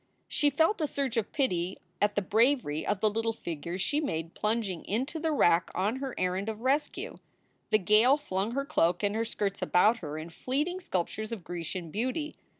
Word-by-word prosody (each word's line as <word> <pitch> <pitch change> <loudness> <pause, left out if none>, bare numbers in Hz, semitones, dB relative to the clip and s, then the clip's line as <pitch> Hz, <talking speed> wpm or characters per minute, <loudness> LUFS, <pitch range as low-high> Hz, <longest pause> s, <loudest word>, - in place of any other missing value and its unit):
She 295 - +2
felt 320 +7 +2
a 305 - +2
surge 275 -4 -2
of 225 -3 -1
pity 185 - 0 0.2
at 205 0 +2
the 205 - +1
bravery 220 - +2
of 205 -2 0
the 215 - +4
little 225 +1 0
figure 170 -1 -5
she 290 +10 0
made 165 - -3
plunging 210 -5 -1
into 265 - -2
the 320 0 0
wrack 175 - +4
on 205 +7 0
her 265 -1 -4
errand 185 +3 0
of 220 0 -5
rescue. 275 +4 -1 0.5
The 215 - +5
gale 215 +7 +5
flung 205 -5 -2
her 275 +1 -1
cloak 175 - +2
and 205 0 +2
her 225 +1 0
skirts 200 -3 -2
about 210 +6 +4
her 155 -6 -6
in 160 +2 -7
fleeting 295 - -2
sculptures 215 - -3
of 220 -6 -5
Grecian 175 0 -5
beauty. 260 - -2
215 Hz, 190 wpm, -29 LUFS, 180-265 Hz, 0.5 s, The